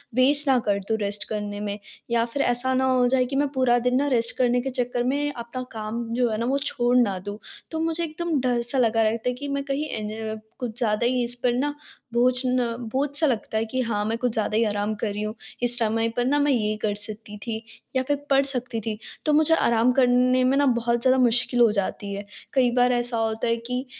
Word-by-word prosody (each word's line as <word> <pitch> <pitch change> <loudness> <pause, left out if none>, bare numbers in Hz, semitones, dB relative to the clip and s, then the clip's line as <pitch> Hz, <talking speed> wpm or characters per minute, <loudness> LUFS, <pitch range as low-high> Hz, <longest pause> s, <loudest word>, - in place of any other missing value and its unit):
Waste 285 +3 +4
ना 265 -2 +5
कर 200 -1 +2
दूँ 220 - +2
रेस्ट 205 -1 -3
करने 205 -1 -4
में। 205 0 -3 0.3
या 230 -1 +3
फिर 240 +4 -3
ऐसा 245 0 +1
ना 260 0 +2
हो 250 -1 +3
जाए 255 0 +2
कि 265 +2 -5
मैं 285 +1 +2
पूरा 255 -3 +3
दिन 250 +2 +1
न 290 - 0
रेस्ट 235 -3 +1
करने 245 -1 +2
के 270 - -3
चक्कर 245 -1 -1
में 285 +3 0
अपना 245 0 -6
काम 220 +2 -4
जो 245 0 +2
है 215 - -2
न - - 0
वो 275 - +2
छोड़ 245 -4 0
ना 205 -6 +2
दूँ। 205 0 -5 0.3
तो 320 - -3
मुझे 330 +1 -1
एकदम 330 -1 -2
डर 245 -2 +1
सा 240 +3 -2
लगा 230 -2 +3
रहता 225 +2 0
है 250 - -1
कि 285 +3 -6
मैं 280 0 -2
कहीं 275 +2 -2
एन 220 0 -4 0.2
कुछ 240 -3 -5
ज़्यादा 230 -2 +1
ही 250 0 +1
इस 240 0 -3
पर 245 -1 +3
न 285 +4 0 0.4
बोझ 245 +1 +4
न 250 -2 0 0.2
बोझ 275 +4 0
सा 315 - +5
लगता 225 -3 -1
है 225 - 0
कि 255 +4 -4
हाँ 220 -4 -1
मैं 225 +2 -1
कुछ 245 +1 0
ज़्यादा 215 -1 0
ही 230 - +3
आराम 205 0 -1
कर 220 - -3
रही 205 - -4
हूँ। 215 0 -3 0.3
इस 240 0 +7
समय 225 0 +1
पर 245 - +1
न 290 +3 +2
मैं 290 0 +3
ये 215 -4 +1
कर 210 -1 0
सकती 210 0 -4
थी 225 -2 -2 0.4
या 260 - +2
फिर 290 - +2
पढ़ 275 0 +4
सकती 250 -3 -2
थी। 215 0 -4 0.3
तो 305 - +3
मुझे 315 +2 +4
आराम 235 -3 +3
करने 255 0 +3
में 260 +2 +3
न 285 - +3
बहुत 235 0 0
ज़्यादा 255 +1 +4
मुश्किल 245 +1 +1
हो 230 -2 +6
जाती 200 0 -3
है। 200 +1 -6 0.3
कई 255 -3 +3
बार 250 0 +4
ऐसा 240 -1 -1
होता 225 +1 -1
है 230 0 +1
कि 250 +1 -2
245 Hz, 245 wpm, -24 LUFS, 220-260 Hz, 0.4 s, इस